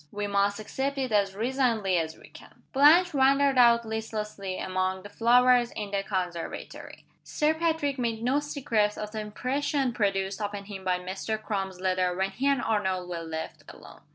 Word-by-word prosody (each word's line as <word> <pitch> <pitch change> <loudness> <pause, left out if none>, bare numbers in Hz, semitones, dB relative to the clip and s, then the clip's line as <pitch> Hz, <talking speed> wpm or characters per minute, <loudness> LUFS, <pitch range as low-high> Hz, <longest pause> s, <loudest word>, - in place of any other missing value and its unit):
We 205 0 -3
must 200 0 +1
accept 270 +6 -3
it 260 -3 -2
as 200 -2 +1
resignedly 225 -5 +1
as 160 -1 -4
we - - -16
can." - - -16
Blanche 310 +6 +6
wandered 275 0 +3
out 235 -1 +5
listlessly 215 -3 -4
among 185 0 -2
the 205 - -9
flowers 245 +2 +4
in 205 -2 -5
the 200 -1 0
conservatory. 180 -4 -5 0.2
Sir 300 +1 +1
Patrick 315 -4 -1
made 230 -2 -2
no 260 +4 +2
secret 235 -8 -1
of 210 0 -5
the 220 - -4
impression 255 +5 -1
produced 195 -2 -1
upon 205 -1 -4
him 195 -2 -8
by 185 -1 +1
Mr. 190 +4 -4
Crum's 195 -4 -4
letter, 185 -1 0
when 190 +1 0
he 265 +7 -2
and 275 -3 +2
Arnold 190 -4 -1
were 170 -1 -4
left 160 -1 -6
alone. - - -14
210 Hz, 175 wpm, -27 LUFS, 190-255 Hz, 0.2 s, Blanche